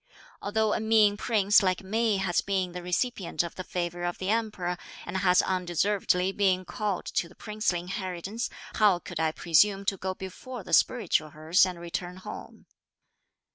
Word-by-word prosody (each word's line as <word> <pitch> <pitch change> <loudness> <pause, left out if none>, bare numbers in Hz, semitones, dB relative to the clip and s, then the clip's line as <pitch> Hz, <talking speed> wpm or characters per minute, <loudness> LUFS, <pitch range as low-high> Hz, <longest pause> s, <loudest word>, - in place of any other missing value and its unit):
Although 215 +1 +1
a - - 0
mean 220 -2 +4
prince 210 -2 +3
like 185 -1 0
me 220 +2 +1
has 190 -3 +1
been 190 -2 -1
the 180 0 -6
recipient 180 -1 -1
of 170 - -6
the 185 - -6
favour 175 -1 -3
of 175 0 -2
the 190 +2 -1
Emperor, 210 -6 -1 0.3
and - - -3
has 180 -1 +4
undeservedly 185 +1 +1
been 190 -2 +1
called 205 -2 -3
to 170 - 0
the 185 - -18
princely 210 -5 -1
inheritance, 185 +4 -4 0.2
how 205 -4 +4
could 175 - -7
I 160 -1 +2
presume 195 +5 +3
to 195 -1 0
go 185 0 -3
before 210 +6 -8
the 170 - -8
spiritual 175 -8 +3
hearse 155 +5 +3
and 180 -2 -6
return 175 +1 -5
home?" 185 - -9
185 Hz, 170 wpm, -28 LUFS, 175-210 Hz, 0.3 s, mean